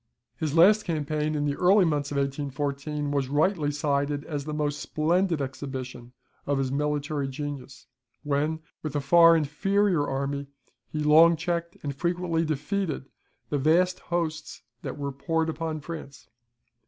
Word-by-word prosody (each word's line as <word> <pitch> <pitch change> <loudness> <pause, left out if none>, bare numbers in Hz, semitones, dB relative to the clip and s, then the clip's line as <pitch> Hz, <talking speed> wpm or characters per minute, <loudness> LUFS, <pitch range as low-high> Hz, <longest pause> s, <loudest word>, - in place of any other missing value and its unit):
His 155 +2 -2
last 205 +6 +6
campaign, 155 -2 -1
in 145 -1 0
the 145 -1 0
early 190 +2 +5
months 145 -3 0
of 145 - -3
1814, 140 +1 -2
was 140 -2 0
rightly 155 +1 +2
cited 145 0 -1
as 145 -3 -4
the 155 - -4
most 150 -1 -1
splendid 165 +2 +1
exhibition 130 -2 -6 0.3
of 145 -1 +1
his 135 -1 -1
military 145 0 -1
genius, 135 -1 -6 0.4
when, 150 +2 0 0.2
with 155 -2 -5
a - - +2
far 165 +4 +6
inferior 170 +2 +1
army, 140 +1 -2 0.4
he 155 - -3
long 160 +3 +7
checked 170 +1 -3
and 140 -2 -3
frequently 170 +1 0
defeated 155 -1 -2 0.4
the 145 - +1
vast 175 +6 +3
hosts 165 -6 -3 0.2
that - - -5
were 140 -1 -3
poured 160 +4 -1
upon 160 0 -4
France. 140 -7 -8
150 Hz, 145 wpm, -27 LUFS, 140-165 Hz, 0.4 s, long